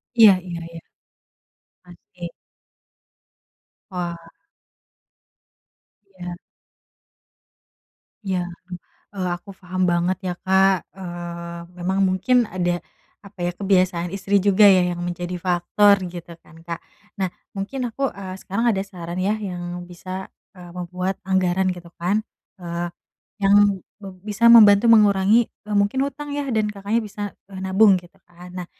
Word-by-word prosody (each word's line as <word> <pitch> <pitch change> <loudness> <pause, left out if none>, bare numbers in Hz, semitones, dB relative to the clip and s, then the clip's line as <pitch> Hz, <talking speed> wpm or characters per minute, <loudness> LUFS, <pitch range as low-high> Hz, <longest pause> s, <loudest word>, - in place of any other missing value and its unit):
Iya 220 -4 +9
iya 170 -1 -5
iya. 165 - -7 1.1
Pasti. 175 0 -10 1.6
Wah. 175 -2 -3 2.0
Iya. 175 -1 -6 1.9
Iya, 185 -2 0
duh. 170 - -10 0.6
Eee, 185 -2 -2
aku 195 +2 -13
paham 185 0 -2
banget 175 +1 +1
ya, 180 - -1
Kak. 190 0 +3
Eee, 175 -2 -7 0.2
memang 190 +2 0
mungkin 195 +6 +3
ada 175 -1 -1 0.4
apa 200 -2 -14
ya 175 - -1
kebiasaan 185 -3 +1
istri 195 +1 0
juga 205 +1 +6
ya, 185 -2 +6
yang 175 - -6
menjadi 175 0 -4
faktor 190 +3 +3
gitu, 175 -1 -9
kan, 165 0 -17
Kak. 170 0 -6 0.4
Nah, 190 -2 -1 0.3
mungkin 245 +6 -3
aku, 270 +4 -2
eee, 190 -1 -7
sekarang 200 +5 -2
ada 195 -4 +1
saran 175 -3 -8
ya, 200 - +2
yang 175 -3 -5
bisa, 185 +2 -7 0.2
eee, 180 -3 -12
membuat 180 +1 -3
anggaran 190 0 +1
gitu, 175 -1 -11
kan, 180 +5 0 0.4
eee, 175 0 -3 0.5
yang 200 -1 +4 0.2
be 195 -1 -8
bisa 210 +4 +3
membantu 215 0 +8
mengurangi, 210 +1 +5
eee, 210 -1 -6
mungkin 235 +7 +2
hutang, 290 +1 -5
ya, 290 - -2
dan 215 -1 +1
Kakaknya 210 +2 -1
bisa, 210 -1 -7 0.3
eee, 190 -1 -8
nabung 195 +1 +5
gitu, 175 -1 -11
kan. 175 +1 -13
Nah, 180 -1 -6
190 Hz, 130 wpm, -22 LUFS, 175-205 Hz, 2.0 s, Iya